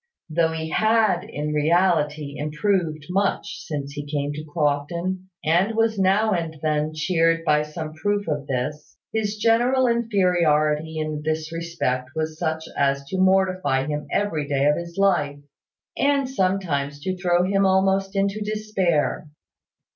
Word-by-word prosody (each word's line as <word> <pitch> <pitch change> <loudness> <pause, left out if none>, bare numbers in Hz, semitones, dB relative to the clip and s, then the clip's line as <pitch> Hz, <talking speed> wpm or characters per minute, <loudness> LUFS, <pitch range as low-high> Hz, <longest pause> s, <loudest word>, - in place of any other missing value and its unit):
Though 165 0 +2
he 160 0 -4
had 215 -5 +2
in 150 +1 -4
reality 150 -2 +1
improved 155 0 -1
much 200 +1 -1
since 145 -3 -5
he 145 0 -5
came 145 -1 -1
to 150 +1 -6
Crofton, 170 +5 -2 0.2
and 180 +8 +2
was 225 -2 +1
now 200 +3 +3
and 165 -3 -3
then 155 0 0
cheered 165 0 +1
by 150 -2 +3
some 155 +1 -6
proof 205 +5 -1
of 145 -2 -2
this, 135 +4 -4 0.2
his 215 -1 -1
general 240 +4 +3
inferiority 170 -9 +2
in 155 -1 -3
this 155 0 -2
respect 165 -7 -2
was 155 0 -3
such 160 -2 -1
as 140 0 +1
to 190 - -2
mortify 185 -8 +2
him 150 0 -3
every 165 -8 0
day 140 -1 +1
of 150 0 +4
his 170 +1 -7
life, 150 -8 +2 0.6
and 280 -1 +2
sometimes 185 - -1
to 185 +4 -2
throw 175 -1 +2
him 195 +1 +2
almost 190 +1 +2
into 195 +2 0
despair. 200 -8 -1
165 Hz, 145 wpm, -23 LUFS, 150-195 Hz, 0.6 s, of